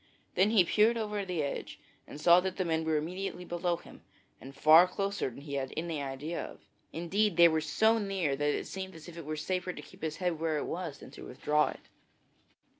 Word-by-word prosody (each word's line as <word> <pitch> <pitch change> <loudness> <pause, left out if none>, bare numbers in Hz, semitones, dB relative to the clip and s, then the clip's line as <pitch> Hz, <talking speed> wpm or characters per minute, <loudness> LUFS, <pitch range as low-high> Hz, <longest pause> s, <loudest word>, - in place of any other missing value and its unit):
Then 190 +3 +3
he 215 -4 +5
peered 220 +6 +3
over 210 -2 -2
the 180 -5 -2
edge 140 - -5 0.3
and 145 - -9
saw 170 +3 +7
that 190 0 -3
the 185 - 0
men 160 -1 0
were 160 -1 +2
immediately 180 +3 -4
below 175 0 -1
him - - -15 0.4
and 135 +1 -11
far 160 +5 +7
closer 200 -3 -2
than 130 +3 -12
he 140 -1 -8
had 135 -1 -2
any 160 -2 -2
idea 140 +5 -4
of. - - -10 0.3
Indeed, 180 +3 0
they 170 0 +9
were 160 -1 +1
so 220 +9 +2
near 190 -9 -1
that 145 +1 0
it - - -4
seemed 190 -2 -6
as 160 0 -12
if 175 - -10
it 170 -3 -8
were 155 +1 -4
safer 180 +3 -2
to 150 - -8
keep - - -16
his 155 -1 -3
head 175 -3 -1
where 160 -1 0
it - - -2
was 165 -4 -4
than - - -13
to - - -12
withdraw 150 +4 +1
it. - - -9
170 Hz, 225 wpm, -31 LUFS, 150-190 Hz, 0.4 s, they